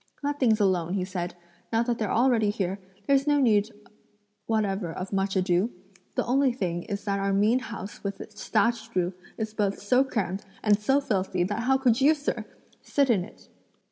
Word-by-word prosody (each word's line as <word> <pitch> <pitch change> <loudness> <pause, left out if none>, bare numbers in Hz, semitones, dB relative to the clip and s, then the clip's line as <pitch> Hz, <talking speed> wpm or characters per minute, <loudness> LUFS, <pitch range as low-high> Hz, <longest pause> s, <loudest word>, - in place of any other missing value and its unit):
"Let 290 0 -1
things 225 -4 +3
alone," 185 -3 +1
he 185 -2 -1
said; 180 -2 -4 0.4
"now 225 0 +2
that 240 -1 -1
they're 215 -3 -1
already 235 -3 +3
here, 195 -1 -2 0.3
there's 275 +1 +3
no 290 -1 +4
need 215 -5 +3 0.8
whatever 200 -5 0
of 185 +4 -6
much 195 0 0
ado. 185 +3 +2 0.5
The - - 0
only 265 +2 +3
thing 175 -7 -2
is 200 -2 -4
that 200 -2 -1
our 195 0 0
mean 210 +5 +3
house 230 -5 -8
with 200 -1 -4
its 210 -1 -9
thatched 230 +1 +1
roof 180 0 +1 0.2
is 220 -1 -3
both 205 -2 0
so 250 +6 +3
crammed 205 -7 -2 0.2
and 210 -1 +4
so 270 +7 +2
filthy 190 -7 0
that 205 +5 -2
how 265 +1 +4
could 255 -2 +2
you, 300 +4 +6
sir, 290 0 -3 0.4
sit 280 -3 +2
in 195 -6 +2
it!" 210 - -14
210 Hz, 190 wpm, -27 LUFS, 195-240 Hz, 0.8 s, you